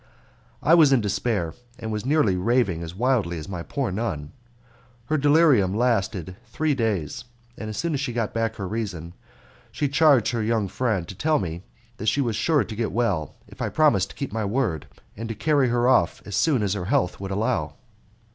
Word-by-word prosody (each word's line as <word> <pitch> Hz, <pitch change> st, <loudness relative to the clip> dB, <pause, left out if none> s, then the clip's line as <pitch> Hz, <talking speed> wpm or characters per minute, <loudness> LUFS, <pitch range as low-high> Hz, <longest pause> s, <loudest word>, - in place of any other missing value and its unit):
I 160 Hz, -, +4 dB
was 160 Hz, -5 st, +7 dB
in 135 Hz, -, +5 dB
despair, 100 Hz, -4 st, -1 dB, 0.2 s
and 110 Hz, -, -5 dB
was 105 Hz, +3 st, -3 dB
nearly 140 Hz, -10 st, +3 dB
raving 100 Hz, -3 st, +1 dB
as 85 Hz, +1 st, -7 dB
wildly 110 Hz, -7 st, +1 dB
as 75 Hz, -, -7 dB
my 90 Hz, -3 st, -5 dB
poor 130 Hz, +5 st, -3 dB
nun. 90 Hz, -8 st, -3 dB, 0.7 s
Her 155 Hz, +6 st, 0 dB
delirium 145 Hz, -, +4 dB
lasted 100 Hz, -6 st, 0 dB
three 155 Hz, -1 st, 0 dB
days, 110 Hz, -, -2 dB, 0.3 s
and 110 Hz, -, -6 dB
as 110 Hz, -, -6 dB
soon 170 Hz, -1 st, -1 dB
as 140 Hz, -, -1 dB
she 135 Hz, -2 st, -2 dB
got 115 Hz, -2 st, -2 dB
back 115 Hz, 0 st, -1 dB
her 100 Hz, -3 st, -5 dB
reason 90 Hz, -6 st, -4 dB, 0.6 s
she 145 Hz, +5 st, -1 dB
charged 140 Hz, -5 st, +4 dB
her 115 Hz, -2 st, -1 dB
young 110 Hz, -2 st, 0 dB
friend 100 Hz, -4 st, -1 dB
to -, -, -7 dB
tell 155 Hz, -, +1 dB
me 85 Hz, -2 st, -4 dB, 0.4 s
that 110 Hz, -, -5 dB
she -, -, 0 dB
was 120 Hz, -5 st, 0 dB
sure 150 Hz, +2 st, +2 dB
to 110 Hz, +1 st, -8 dB
get 115 Hz, 0 st, -2 dB
well 100 Hz, -11 st, -1 dB
if -, -, -12 dB
I -, -, -1 dB
promised 120 Hz, -12 st, +3 dB
to -, -, -12 dB
keep 140 Hz, -, -4 dB
to -, -, -12 dB
my 110 Hz, -1 st, -1 dB
word, 100 Hz, -, -1 dB, 0.3 s
and 115 Hz, +2 st, -6 dB
to 115 Hz, -, -4 dB
carry 145 Hz, 0 st, +2 dB
her 120 Hz, +1 st, +2 dB
off 105 Hz, -10 st, +2 dB
as 100 Hz, -, -5 dB
soon 140 Hz, -9 st, +2 dB
as 100 Hz, -2 st, 0 dB
her 95 Hz, -4 st, -3 dB
health 90 Hz, -1 st, 0 dB
would 95 Hz, 0 st, -5 dB
allow. 105 Hz, +3 st, -1 dB
110 Hz, 205 wpm, -24 LUFS, 95-130 Hz, 0.7 s, was